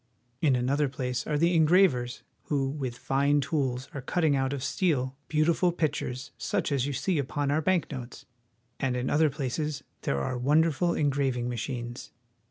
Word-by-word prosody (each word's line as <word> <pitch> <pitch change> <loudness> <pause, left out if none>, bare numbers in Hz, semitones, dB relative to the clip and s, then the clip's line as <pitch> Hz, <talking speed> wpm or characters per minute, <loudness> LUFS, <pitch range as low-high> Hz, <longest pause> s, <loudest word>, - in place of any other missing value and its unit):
In 145 -5 +4
another 135 +4 +1
place 125 -3 -3
are 150 - +1
the 170 +4 +3
engravers, 160 -7 +3 0.2
who 135 -2 0
with 135 -4 -4
fine 140 +3 +2
tools 135 -3 -1
are 140 - -5
cutting 155 +2 +1
out 135 0 0
of 140 -2 -3
steel 135 -9 0
beautiful 165 +3 +2
pictures 145 -6 -2
such - - -1
as 140 -1 +1
you 145 - -2
see 175 +3 0
upon 140 +1 -1
our 155 +2 +2
bank 180 0 +1
notes; 130 -3 -7 0.5
and 130 -3 0
in 125 +1 -1
other 155 +1 +4
places 145 +1 -3 0.2
there 70 - 0
are 125 - -2
wonderful 160 +5 +2
engraving 135 -4 0
machines. 120 0 -5
140 Hz, 165 wpm, -28 LUFS, 130-155 Hz, 0.5 s, In